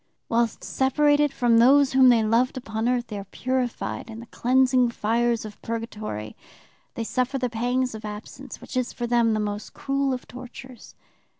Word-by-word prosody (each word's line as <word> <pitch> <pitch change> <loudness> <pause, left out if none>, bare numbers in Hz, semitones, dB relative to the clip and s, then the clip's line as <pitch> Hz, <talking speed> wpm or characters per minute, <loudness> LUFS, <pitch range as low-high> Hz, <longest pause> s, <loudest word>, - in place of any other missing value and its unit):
"'Whilst 230 -1 0
separated 290 +2 +2
from 245 -4 +3
those 270 +3 +5
whom 260 -1 +7
they 230 -2 +4
loved 235 +4 +1
upon 225 -1 -2
earth, 245 -1 0
they 210 -3 -6
are - - -6
purified 250 +3 -3
in 225 0 -8
the 235 - -9
cleansing 255 +1 +2
fires 235 +1 0
of 210 -1 -10
purgatory, 215 - -5 0.6
they 230 - -3
suffer 255 +4 -1
the 250 -2 -2
pangs 245 +2 -1
of 220 0 -8
absence, 215 +6 -8
which - - -10
is 255 -1 -1
for 240 - -4
them 235 -2 +2
the - - -1
most 205 0 -4
cruel 275 0 -1
of 255 -1 -4
tortures. 250 -1 -11
240 Hz, 175 wpm, -25 LUFS, 225-260 Hz, 0.6 s, whom